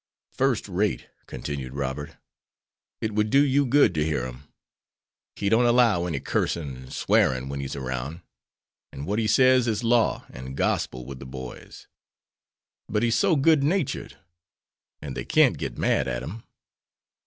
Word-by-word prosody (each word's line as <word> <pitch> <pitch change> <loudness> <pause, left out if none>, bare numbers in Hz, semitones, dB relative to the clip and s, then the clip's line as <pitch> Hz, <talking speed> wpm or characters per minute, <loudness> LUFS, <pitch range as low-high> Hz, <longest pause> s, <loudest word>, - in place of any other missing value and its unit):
"First 130 -6 0
rate," 100 +2 -1 0.2
continued 65 0 -6
Robert. 70 +1 -4 0.8
"It 110 -1 -2
would 105 +1 +1
do 140 +5 +5
you 140 0 +2
good 140 -6 +4
to 75 -2 +1
hear 75 -5 -1
him. 65 +3 -9 0.9
He 100 - -2
don't 115 +4 +4
allow 115 -7 +3
any 80 -6 -2
cursing 75 -2 -2
and 65 0 -12
swearing 65 +1 +1
when 70 0 -4
he's 70 0 -4
around. 65 +5 -4 0.7
And 70 - -7
what 105 +5 -1
he 110 - 0
says 130 +2 +4
is 110 0 -1
law 115 -1 +2
and 65 +2 -8
gospel 65 0 -1
with 70 0 -8
the 65 - -9
boys. 65 -1 -9 1.0
But 105 +2 0
he's 115 -1 +2
so 190 +2 +3
good 145 0 +4
natured; 165 0 -1 0.9
and 70 -4 -6
they - - -3
can't - - +3
get - - -4
mad - - +1
at - - -3
him." 110 - -8
90 Hz, 155 wpm, -25 LUFS, -, 1.0 s, do